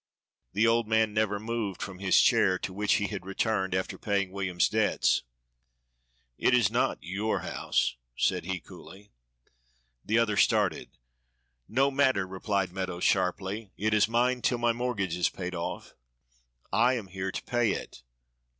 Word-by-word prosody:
The 105 +4 +3
old 115 0 +2
man 110 -1 +2
never 105 -1 0
moved 110 -3 -3
from 95 -2 -6
his 95 -2 +4
chair, 95 -1 +4
to 95 - -5
which 105 +2 +1
he 105 - +1
had 100 -3 -5
returned 95 -1 -1
after 95 - -3
paying 100 -2 -1
William's 95 -3 0
debts. - - +2 1.2
"It 125 - +4
is 120 - +3
not - - +1
your 100 +7 -2
house," - - -1 0.2
said - - +1
he 95 0 -2
coolly. 95 +3 -14 0.9
The 110 - +1
other 110 -3 +2
stared. 105 -8 +2 0.8
"No 135 +5 +2
matter," 130 -8 +2
replied 95 0 -2
Meadows 90 -2 -4
sharply, 95 +2 0
"it 105 +2 0
is 105 0 +4
mine 125 +2 +1
till 125 - +1
my 120 0 +2
mortgage 115 -7 -2
is 90 - +1
paid 90 -1 -6
off." 85 -1 -5 0.8
"I 120 +3 +4
am 115 -5 -4
here 95 0 -4
to - - -5
pay 120 -4 +1
it." - - -7
100 Hz, 155 wpm, -28 LUFS, 95-115 Hz, 1.2 s, his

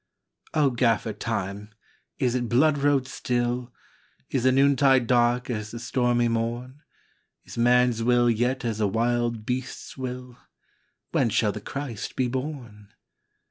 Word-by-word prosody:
" - - -33
O 145 -3 +3
Gaffer 115 -2 +1
Time, 105 -1 -4 0.5
is 125 -4 +1
it 120 -2 -1
blood 145 +4 +3
road 140 -2 +2
still? 120 -1 -2 0.6
Is 130 -2 0
the 130 - +6
noontide 135 -1 +4
dark 120 0 +2
as 110 -2 -4
the 115 - -7
stormy 120 0 +1
morn? 120 +4 -3 0.6
Is - - -10
man 125 +1 +4
s 115 -1 -3
will 120 +1 +3
yet 125 +3 0
as 110 -2 -2
a 105 - +3
wild 115 +1 0
beast 125 +2 -4
s - - -14
will? 125 -1 -6 0.7
When 115 - +2
shall 105 0 +2
the 105 - -7
Christ 135 -3 -6
be 130 - +1
born? 120 -6 -6
120 Hz, 150 wpm, -25 LUFS, 115-130 Hz, 0.7 s, the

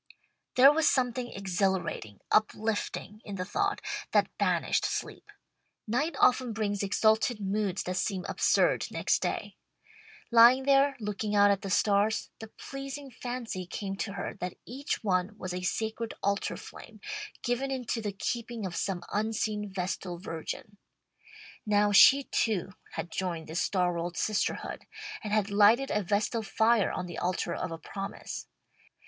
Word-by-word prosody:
There 265 +3 +9
was 320 0 +4
something 250 -1 0
exhilarating, 190 - -2
uplifting 215 0 0
in 200 - -6
the 185 -1 -3
thought, 405 - -1 0.3
that - - +2
banished - - +1
sleep. - - -4 0.6
Night 285 +8 0
often 250 -2 +4
brings 205 -2 -1
exalted 220 +3 +2
moods 200 -1 -1
that 185 0 -3
seem 190 -1 -1
absurd - - +2
next - - +1
day. - - -3 0.7
Lying 235 +3 +7
there, 275 0 +4
looking 210 0 -2
out 205 0 +6
at 200 -1 0
the 195 - -5
stars, 205 +3 +2
the 220 - -7
pleasing 275 +4 -8
fancy 235 -7 -5
came 195 +1 -4
to 195 - -3
her - - -4
that 180 -1 -4
each 270 +3 -4
one 190 +1 0
was 185 -3 -5
a 180 - -3
sacred 220 +4 -2
altar 200 0 0
flame, - - -12 0.4
given 245 +2 0
into 250 -3 -2
the 210 -2 -2
keeping 230 +2 -3
of 175 -2 -4
some 185 -3 -2
unseen 215 -1 -1
vestal 180 -1 -3
virgin. 175 +3 -6 0.9
Now 205 -1 +3
she 275 +7 +8
too 200 -7 -1 0.2
had 170 - -5
joined 170 -2 -3
this 165 +2 -2
star 180 -2 +1
world 170 0 -4
Sisterhood, 215 -1 -1 0.4
and 210 - -4
had 210 -1 +1
lighted 215 +6 +5
a 210 - +1
vestal 210 +4 0
fire 220 0 +2
on 180 - -3
the 175 -2 -6
altar 180 +1 -1
of - - -3
a 165 - -4
promise. 195 +4 -6
210 Hz, 150 wpm, -29 LUFS, 190-235 Hz, 0.9 s, There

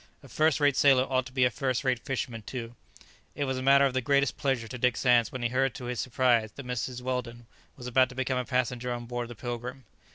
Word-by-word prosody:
A - - -12
first 155 -1 +2
rate 145 -2 +3
sailor 135 -2 +5
ought 130 -1 -1
to - - -12
be 130 -1 +1
a 125 - +2
first 130 0 -1
rate 130 -3 +1
fisherman 125 -4 -4
too. 115 +1 -6 0.6
It 145 - -2
was 130 -1 -2
a - - -4
matter 140 +1 +5
of 135 - 0
the 130 - 0
greatest 140 +2 +2
pleasure 135 -5 -1
to 125 - -7
Dick 125 -1 +2
Sands 120 -3 +3
when 130 -2 -5
he 120 - +1
heard 130 0 0
to 125 - -7
his 125 -1 -3
surprise 120 -3 +2
that 140 - -9
Mrs. 125 0 -4
Weldon 125 -2 -4 0.3
was 125 - -10
about 130 +1 +3
to 125 - -11
become 130 0 -1
a - - -1
passenger 125 -1 -1
on 120 0 -4
board 120 0 -4
the 120 - -9
"Pilgrim." 120 +2 -6
125 Hz, 250 wpm, -28 LUFS, 120-130 Hz, 0.6 s, sailor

